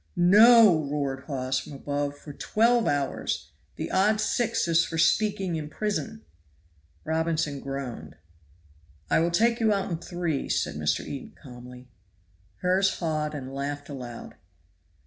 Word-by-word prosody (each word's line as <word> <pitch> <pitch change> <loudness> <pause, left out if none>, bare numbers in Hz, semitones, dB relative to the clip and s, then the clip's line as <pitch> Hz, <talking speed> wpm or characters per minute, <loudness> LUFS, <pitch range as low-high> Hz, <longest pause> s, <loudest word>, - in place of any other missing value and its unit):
"No!" 210 -2 +7
roared 140 -2 -3
Hawes 130 -2 -2
from - - -10
above, 145 +1 -3
"for 145 0 -11
twelve 230 +8 +2
hours; 140 -2 -2 0.2
the - - -5
odd 210 +3 +3
six 220 -2 0
is 165 0 +4
for 165 - -5
speaking 190 -1 +1
in 150 -1 -6
prison." 215 +4 -4 0.8
Robinson 160 -2 -1
groaned. 130 - -6 1.0
"I - - +4
will 170 +1 +2
take 230 +7 +2
you 220 -2 +3
out 195 -2 -1
in 165 - -2
three," 175 -5 -3
said - - 0
Mr. 75 +1 -1
Eden 140 - -8
calmly. 125 -1 -12 0.8
Hawes 190 +2 +2
heard 155 -3 -2
and 135 -2 -7
laughed 145 +1 -4
aloud. 125 -4 -8
155 Hz, 135 wpm, -26 LUFS, 140-195 Hz, 1.0 s, No